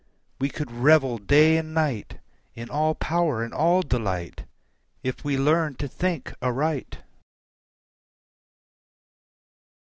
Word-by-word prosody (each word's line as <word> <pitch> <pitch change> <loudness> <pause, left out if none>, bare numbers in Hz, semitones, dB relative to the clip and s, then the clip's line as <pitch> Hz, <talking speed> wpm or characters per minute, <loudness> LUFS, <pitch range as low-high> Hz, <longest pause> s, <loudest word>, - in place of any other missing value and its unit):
We 135 +1 0
could 145 -4 -6
revel 130 0 +3
day 150 +9 +5
and 160 0 -4
night 145 -10 -1 0.4
In 115 +1 -8
all 155 +1 +1
power 160 -8 0
and 115 - -6
all 175 +4 +3
delight 95 - -3 0.6
If 130 0 -4
we 145 -2 0
learn 150 +1 +2
to 140 - -4
think 175 +2 -3
aright. 135 +3 -2
145 Hz, 110 wpm, -25 LUFS, 125-155 Hz, 0.6 s, day